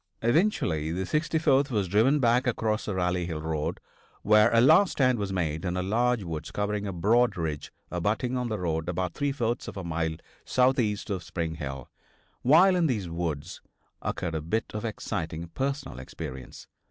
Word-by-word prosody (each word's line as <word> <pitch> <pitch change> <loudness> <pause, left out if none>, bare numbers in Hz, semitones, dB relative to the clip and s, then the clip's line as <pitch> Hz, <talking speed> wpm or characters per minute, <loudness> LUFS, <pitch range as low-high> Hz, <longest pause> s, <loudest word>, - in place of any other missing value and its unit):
Eventually 115 - +1
the 90 +3 -2
64th 150 - +2
was 105 -6 0
driven 115 +10 +3
back 125 0 +3
across 110 -2 0
the 105 - -3
Rally 90 -1 0
Hill 80 -3 -4
road, 80 -2 -2 0.4
where 105 +2 +5
a 115 - +4
last 160 +10 +6
stand 130 -4 +2
was 100 -1 -2
made 80 -4 -1
in 90 -1 -2
a 90 - -1
large 115 +3 +1
woods 80 -3 -5
covering 105 0 -2
a - - -2
broad 110 +7 +2
ridge 80 -3 -3 0.2
abutting 105 +8 -1
on 125 -1 -1
the 110 - -2
road 80 -2 -2
about 90 -1 -2
three 145 0 -1
fourths 120 -3 -2
of - - -7
a 95 - -4
mile 80 -1 -2 0.3
southeast 125 -5 +1
of 95 -2 -2
Spring 85 -1 -3
Hill. 70 -5 -6 0.5
While 175 +8 +6
in 175 -2 +3
these 105 - -2
woods, 85 -1 -4 0.4
occurred 85 -2 -3
a 80 - -2
bit 85 +9 -2
of 105 +1 -4
exciting 85 -6 -4
personal 135 - -3
experience. 65 0 -8
100 Hz, 175 wpm, -27 LUFS, 85-125 Hz, 0.5 s, last